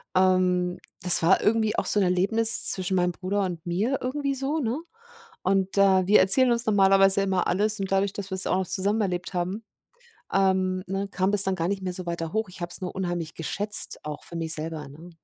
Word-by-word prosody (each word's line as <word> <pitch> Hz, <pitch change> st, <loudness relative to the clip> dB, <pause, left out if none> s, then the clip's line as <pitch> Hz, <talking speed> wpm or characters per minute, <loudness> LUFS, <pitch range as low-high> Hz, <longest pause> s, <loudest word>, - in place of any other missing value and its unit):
ähm, 185 Hz, -1 st, +1 dB, 0.2 s
das 180 Hz, -, +7 dB
war 185 Hz, +4 st, +3 dB
irgendwie 220 Hz, 0 st, 0 dB
auch -, -, -1 dB
so 210 Hz, -, +1 dB
'n 200 Hz, -, +2 dB
Erlebnis 200 Hz, +5 st, +4 dB
zwischen 185 Hz, 0 st, -1 dB
meinem 180 Hz, 0 st, 0 dB
Bruder 190 Hz, +3 st, -4 dB
und 175 Hz, -3 st, -6 dB
mir 205 Hz, +10 st, -2 dB
irgendwie 280 Hz, +2 st, -3 dB
so, 275 Hz, +4 st, -3 dB
ne? 250 Hz, +2 st, -3 dB, 0.6 s
Und, 190 Hz, +1 st, -1 dB
äh, 190 Hz, -2 st, +3 dB
wir 210 Hz, -, +5 dB
erzählen 245 Hz, +7 st, +4 dB
uns 235 Hz, 0 st, 0 dB
normalerweise 195 Hz, -1 st, +4 dB
immer 190 Hz, -2 st, -1 dB
alles 210 Hz, +4 st, 0 dB
und 195 Hz, -1 st, -5 dB
dadurch, 195 Hz, 0 st, 0 dB
dass 200 Hz, -1 st, -7 dB
wir's 190 Hz, +1 st, +3 dB
auch 185 Hz, -, 0 dB
noch 185 Hz, -, -4 dB
zusammen 205 Hz, +3 st, -1 dB
erlebt 180 Hz, -1 st, -4 dB
haben, 185 Hz, +5 st, -4 dB, 0.7 s
ähm, 190 Hz, -1 st, 0 dB
ne, 195 Hz, +1 st, -4 dB
kam 190 Hz, +1 st, -1 dB
das 205 Hz, -1 st, +7 dB
dann 190 Hz, -1 st, 0 dB
gar 170 Hz, -1 st, -3 dB
nicht 200 Hz, -1 st, -4 dB
mehr 185 Hz, -, -3 dB
so 185 Hz, 0 st, -4 dB
weiter 170 Hz, -1 st, -5 dB
hoch, 220 Hz, 0 st, -2 dB
ich 180 Hz, -, -12 dB
habe 175 Hz, 0 st, -5 dB
es -, -, -1 dB
nur 180 Hz, -, -6 dB
unheimlich 175 Hz, -4 st, -4 dB
geschätzt 205 Hz, +6 st, 0 dB
auch 150 Hz, -1 st, -7 dB
für 170 Hz, -, -9 dB
mich 160 Hz, -1 st, -3 dB
selber, 155 Hz, -2 st, -6 dB
ne? 160 Hz, +5 st, -14 dB
190 Hz, 215 wpm, -24 LUFS, 180-205 Hz, 0.7 s, das